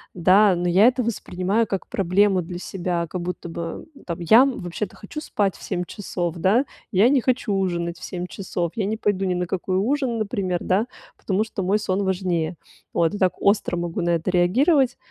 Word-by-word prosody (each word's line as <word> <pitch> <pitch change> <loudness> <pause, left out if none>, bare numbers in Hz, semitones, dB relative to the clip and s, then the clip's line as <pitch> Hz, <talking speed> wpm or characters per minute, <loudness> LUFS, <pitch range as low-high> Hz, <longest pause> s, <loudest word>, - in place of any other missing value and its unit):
Да, 190 +3 +5
но 175 +1 -1
я 190 +6 +6
это 250 0 +2
воспринимаю 210 -1 -1
как 195 - -3
проблему 195 +1 +2
для 175 +1 -6
себя. 175 -2 -2
Как 180 +2 -5
будто 175 0 -5
бы 165 0 -6 0.2
там 170 -1 -4
я, 175 +7 +6
м, 270 -2 -1
вообще-то 180 +3 -5
хочу 260 +9 -8
спать 205 - -1
в - - -16
7 180 - -2
часов, 175 -3 -4
да, 200 - +3 0.3
я 200 +4 +5
не 270 -1 +3
хочу 245 -4 0
ужинать 175 -3 -1
в - - -13
7 180 -1 -5
часов, 175 -2 -3
я 215 - -1
не 215 +2 -2
пойду 200 -3 0
ни 180 -1 0
на 180 0 -1
какой 185 0 -1
ужин, 250 +3 0
например, 200 -5 -1
да, 200 +6 +1 0.3
потому 195 +1 0
что 220 -2 -5
мой 195 +3 +2
сон 200 -1 -1
важнее. 180 -3 -1 0.4
Вот, 165 +1 +2
я 205 - -4
так 185 -2 +1
остро 200 -3 +2
могу 175 +2 -3
на 175 - 0
это 170 +2 0
реагировать. 250 - +3
190 Hz, 205 wpm, -23 LUFS, 175-210 Hz, 0.4 s, я